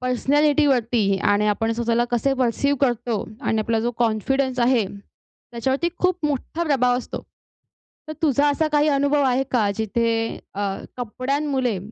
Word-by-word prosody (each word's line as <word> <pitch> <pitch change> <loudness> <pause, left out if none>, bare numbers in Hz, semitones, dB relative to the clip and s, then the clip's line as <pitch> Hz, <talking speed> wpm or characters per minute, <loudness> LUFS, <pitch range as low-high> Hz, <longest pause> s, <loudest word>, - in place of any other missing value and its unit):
Personality 290 +4 +2
वरती 230 -7 +1
आणि 205 +2 +2
आपण 225 +2 0
स्वतःला 235 +1 0
कसे 240 +3 +1
पर्सिव 260 +3 +1
करतो 240 -4 0 0.2
आणि 225 -4 0
आपला 225 +1 0
जो 235 +2 0
कॉन्फिडन्स 255 +4 0
आहे, 240 -2 +3 0.7
त्याच्यावरती 265 +7 -1
खूप 365 -2 0
मोठा 295 +3 -3
प्रभाव 250 -5 +2
असतो. 250 - -6 0.9
तर - - -4
तुझा 290 -1 +3
असा 310 +2 +1
काही 295 0 +3
अनुभव 285 0 +2
आहे 260 0 +2
का? 220 -5 +2
जिथे 225 +1 -1 0.2
अ, 200 - -4 0.4
कपड्यांमुळे 255 -1 -1
250 Hz, 140 wpm, -22 LUFS, 230-280 Hz, 0.9 s, आहे